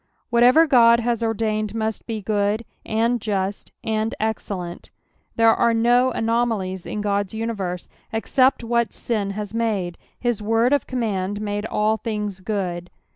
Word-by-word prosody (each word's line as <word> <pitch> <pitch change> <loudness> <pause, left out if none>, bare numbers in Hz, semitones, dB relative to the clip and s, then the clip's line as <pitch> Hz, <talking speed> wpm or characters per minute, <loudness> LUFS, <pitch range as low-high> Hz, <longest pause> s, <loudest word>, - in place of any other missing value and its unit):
Whatever 245 +7 +6
God 235 -5 +6
has 235 -1 0
ordained 215 -1 -1
must 220 -1 -3
be 220 -3 -4
good, 210 +2 0 0.2
and 230 +2 0
just, 200 -1 -2
and 220 0 -1
excellent. 195 -5 -4 0.5
There 225 -1 +5
are 235 -1 +2
no 240 +3 +4
anomalies 225 -6 -1
in 210 - -3
God's 200 0 -1
universe, 200 -6 -3 0.2
except 255 +3 +2
what 235 0 0
sin 210 -4 -2
has 210 0 -5
made; 205 -7 -1 0.2
his 240 -4 -1
word 225 +5 +2
of 285 - +1
command 205 -5 -2
made 205 0 -3
all 215 +1 +1
things 210 -4 -4
good. 185 -3 -3
220 Hz, 140 wpm, -22 LUFS, 205-230 Hz, 0.5 s, Whatever